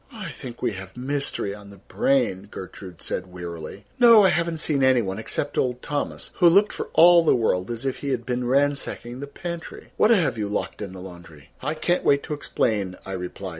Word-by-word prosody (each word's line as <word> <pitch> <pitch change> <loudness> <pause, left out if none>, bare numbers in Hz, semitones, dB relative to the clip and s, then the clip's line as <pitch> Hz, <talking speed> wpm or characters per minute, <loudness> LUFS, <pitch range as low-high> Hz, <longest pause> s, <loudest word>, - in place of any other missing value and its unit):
"I 210 -8 -7
think 120 -1 -9
we 120 - +1
have 95 +1 -9
mystery 135 -6 -2
on 100 0 -12
the 100 - -12
brain," 160 - 0
Gertrude 95 -2 -9
said 90 - -4
wearily. 85 +2 -8
"No, 230 -3 +8
I 190 - +6
haven't 170 -1 0
seen 150 -3 0
any 130 -2 +4
one, 95 +1 -4
except 145 +6 -2
old 125 -1 -1
Thomas, 145 0 -4
who 175 -2 +7
looked 200 +5 +4
for - - -5
all 175 0 +7
the 160 - +4
world 100 -5 0
as 120 +2 -4
if 135 - -1
he 140 - -4
had - - -2
been 125 -1 -2
ransacking 135 -2 0
the 140 - -6
pantry. 170 +3 -8
What 215 - +4
have 160 - +3
you 105 - -1
locked 105 - -3
in 100 -3 -6
the 95 - -9
laundry?" 85 -6 -12
"I 150 +4 -2
can't 175 +3 0
wait 140 0 +3
to - - -4
explain," 105 -9 -1
I - - -7
replied. 95 +1 -5
125 Hz, 210 wpm, -24 LUFS, 95-155 Hz, -, No